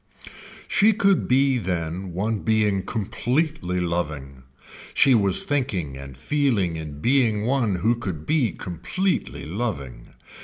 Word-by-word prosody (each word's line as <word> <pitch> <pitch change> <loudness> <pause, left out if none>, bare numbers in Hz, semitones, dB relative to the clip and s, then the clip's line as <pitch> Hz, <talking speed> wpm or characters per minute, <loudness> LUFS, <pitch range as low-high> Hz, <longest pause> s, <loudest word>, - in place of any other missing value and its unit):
She 215 +2 +4
could 200 -3 +2
be 135 0 +3
then 90 -1 -3
one 105 +5 -1
being 105 -3 +1
completely 120 - -1
loving, 75 -6 -3 0.5
she 135 - +5
was 100 -5 +3
thinking 105 - -1
and 70 -1 -10
feeling 110 - 0
in 75 -2 -7
being 120 - +2
one 120 -6 +1
who 110 +7 +2
could 95 -10 -5
be 145 -9 +2
completely 135 - -3
loving. 75 - -5
100 Hz, 120 wpm, -24 LUFS, 85-130 Hz, 0.5 s, she